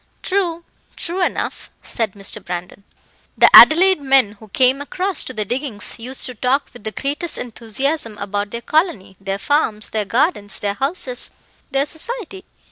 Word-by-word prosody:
"True 350 -4 -1 0.3
true 355 +2 -3
enough," - - -3
said 225 -5 -2
Mr. 200 0 -4
Brandon. 180 +2 -6 0.5
"The - - +6
Adelaide 365 +1 +8
men 270 -6 +4
who 220 - -14
came 260 +6 +2
across 370 +5 -1
to - - -5
the 215 -4 -3
diggings 245 -2 -4
used 255 +3 -2
to 250 - -6
talk 255 +5 0
with 245 -4 -14
the 220 - -2
greatest 290 +7 -1
enthusiasm 235 +1 -3
about 205 0 -3
their 235 +2 -5
colony, 305 - 0
their 195 0 -3
farms, 215 -4 0
their 215 -1 -1
gardens, 230 - 0
their 200 -1 -2
houses, 265 - -1 0.4
their 275 0 +1
society. 385 +3 -5
255 Hz, 155 wpm, -19 LUFS, 210-310 Hz, 0.5 s, Adelaide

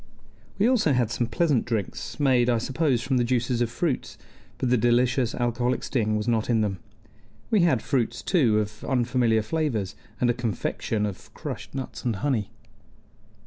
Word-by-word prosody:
We 205 - +3
also 225 - +3
had 120 -3 +1
some 120 -1 0
pleasant 140 0 +1
drinks, 110 +1 -4
made, 125 -4 +3
I 120 - +3
suppose, 130 +1 0
from 130 -1 +1
the 120 - +3
juices 120 0 0
of 120 - +1
fruits, 135 +3 -2 0.4
but 125 - -1
the - - +6
delicious 120 +1 +2
alcoholic 120 +1 0
sting 110 -5 0
was 105 +2 -3
not 115 -1 +1
in 115 -2 +3
them. 100 -3 -1 0.7
We 215 - +4
had 155 -10 +3
fruits, 120 -3 -1
too, 125 - +3
of 105 0 -3
unfamiliar 120 -3 +2
flavors, 115 -7 -1 0.2
and 125 - +2
a 120 - +3
confection 115 -2 -2
of 100 -3 -7
crushed - - -7
nuts 125 -4 -5
and 120 -3 0
honey. 110 -2 -1
120 Hz, 170 wpm, -26 LUFS, 110-130 Hz, 0.7 s, the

